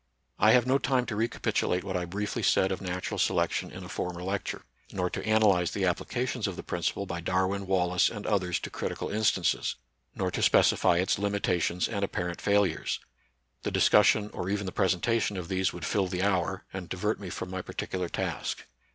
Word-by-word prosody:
I 110 +2 +6
have 125 -2 +5
no 130 +2 +3
time 130 -2 +1
to 115 - -4
recapitiUate 105 -4 0
what 95 -1 -4
I 90 -1 -1
briefly 100 +4 -3
said 95 - +3
of 95 - -3
natural 90 -1 -3
selection - - +1
in - - -9
a - - -8
former 90 0 -4
lecture; 95 +1 -3 0.3
nor 90 -1 -1
to - - -4
analyze 105 -5 +3
the - - 0
applications - - -1
of - - -4
the - - -7
principle 100 - -2
by 85 -2 -4
Darwin, 95 +2 0
Wallace, 90 -1 +3
and 105 -2 -7
others 90 -4 +1
to - - -6
critical - - -4
instances; 105 -4 +1 0.4
nor - - -1
to - - -2
specify 85 - +4
its 95 +1 +1
limitations 100 -3 0
and 100 -2 -2
apparent 90 -3 -3
fail 100 0 +4
ures. 85 -5 -2 0.6
The - - -2
discussion 105 0 +4
or 90 - -3
even 100 0 -1
the 95 - -3
presentation 100 +3 +1
of 90 -2 -5
these 95 0 +1
would 85 -2 -6
fill 100 -2 +1
the 90 0 -2
hour, 95 -1 0
and 95 -2 -6
divert 105 +4 -1
me 100 -3 -6
from 90 +2 -5
my 95 0 -3
particular 90 -1 -4
task. - - -3
95 Hz, 195 wpm, -29 LUFS, 90-105 Hz, 0.6 s, I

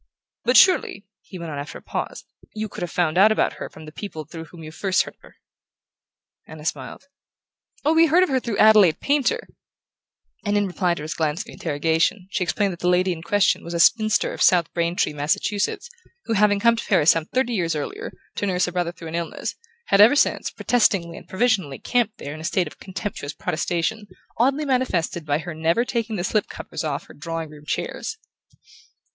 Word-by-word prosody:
But 250 +2 +5
surely," 370 - +4 0.2
he 185 - -11
went 170 -2 -6
on 145 - -4
after 145 - -7
a - - -14
pause, - - -5 0.3
"you 215 0 -3
could - - -9
have 175 - -2
found 175 0 +1
out 210 +3 +7
about 220 - +1
her - - -5
from 160 - -13
the 155 - -10
people 160 -3 -7
through 160 +1 -9
whom 165 0 -13
you 155 - -8
first 185 +3 +1
heard - - -10
of - - -44
her?" - - -18 1.1
Anna 155 -1 -11
smiled. 140 - -4 0.8
"Oh, 310 - +4
we 325 +1 +6
heard 350 +4 +5
of 370 - 0
her 265 -1 +2
through 235 -5 -4
Adelaide 210 -7 +6
Painter 295 - 0 0.5
;" - - -49
and 205 -1 +1
in 205 - +2
reply 180 -2 0
to 150 - -7
his 155 - -4
glance 160 +2 -1
of 225 - -10
interrogation 160 +6 0
she 185 - 0
explained 195 +2 0
that 170 - -11
the 175 - +1
lady 180 +1 +3
in 160 - -9
question 200 +4 +2
was 170 0 -6
a - - -1
spinster 215 +4 +3
of - - -7
South 175 -3 +4
Braintree, 170 -2 0
Massachusetts, 155 - -1 0.4
who, - - -1
having 205 -1 +3
come 235 +2 +4
to 230 - -5
Paris 150 - +5
some 165 -1 -1
thirty 255 -1 0
years 170 -6 0
earlier, 150 - -5 0.3
to 205 - -1
nurse 180 -1 +1
a - - -3
brother 175 -1 -1
through 165 -2 -10
an - - -8
illness, 170 0 -3 0.4
had 200 - +6
ever 225 +7 +8
since - - +2
protestingly 195 -8 +1
and - - -12
provisionally 190 - +1
camped 240 -4 0
there 145 - -7
in 155 - -8
a - - -9
state 180 +3 +1
of 150 - -11
contemptuous 185 -6 -5
protestation 175 +7 -2 0.3
oddly 275 +5 +2
manifested 185 - -1
by 145 0 +2
her 170 +2 -6
never 165 +9 +1
taking 230 -3 -2
the 175 - -2
slip 210 +2 0
covers - - -6
off 145 -3 -2
her - - -14
drawing 165 0 -5
room 150 -1 -14
chairs. 445 - -3
180 Hz, 210 wpm, -23 LUFS, 160-220 Hz, 1.1 s, ever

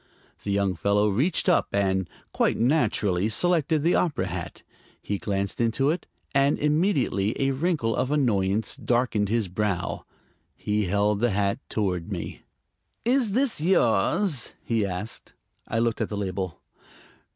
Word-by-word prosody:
The - - -5
young 100 -1 +1
fellow 100 +4 +2
reached 135 - 0
up 180 - +3
and, 95 -2 0 0.2
quite - - +1
naturally, 110 - +1
selected 160 +2 +2
the 170 - +3
opera 145 - +1
hat. 90 -2 -6 0.4
He 100 -1 -3
glanced 100 +3 -2
into 125 +5 +2
it, 170 +1 -4 0.3
and 140 +1 +3
immediately 150 - +1
a 135 0 +2
wrinkle 145 -5 0
of 130 - 0
annoyance 110 -7 +1
darkened 120 -4 0
his 115 -2 +1
brow. 95 -1 -2 0.5
He 105 0 -1
held 100 +2 +1
the 120 +2 +2
hat 100 +1 0
toward 90 -6 -2
me. - - -5 0.6
"Is 240 -4 +2
this 255 - +1
yours?" 155 - +2
he 110 -4 0
asked. 95 +4 -6 0.3
I 115 - -2
looked 115 -1 0
at - - -1
the 105 - -4
label. 95 -3 -3
110 Hz, 140 wpm, -25 LUFS, 100-145 Hz, 0.6 s, up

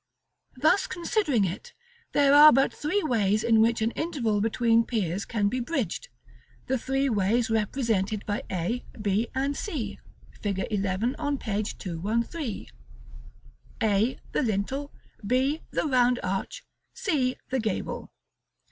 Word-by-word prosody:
Thus 315 +9 +3
considering 335 - +1
it, 195 - -6 0.4
there 285 -1 +5
are 300 +1 +10
but 270 +2 +3
three 365 +7 -1
ways 215 -6 +1
in 225 -1 +4
which 230 0 +2
an 225 - +1
interval 235 -11 -1
between 230 +1 +3
piers 200 -5 -2
can 210 -3 0
be 250 +5 -1
bridged, 260 - -3 0.6
the 260 0 0
three 270 +3 0
ways 225 +1 +1
represented 215 -2 0
by 205 0 -2
A, 185 +7 -2 0.2
B, 210 +2 0
and 275 +2 0
C, 245 - -4 0.4
Fig. 200 -2 -1
XI., 200 +4 0
on 290 -2 -1
page 210 -3 -3
213, 220 - -3 1.2
A, 220 +3 +2
the - - +1
lintel; 260 +6 -2 0.3
B, 260 +8 +1
the - - -1
round 250 -3 +3
arch; 195 - -3 0.3
C, 265 -9 0 0.2
the 260 - +1
gable. 215 -4 -3
235 Hz, 130 wpm, -27 LUFS, 205-275 Hz, 1.2 s, are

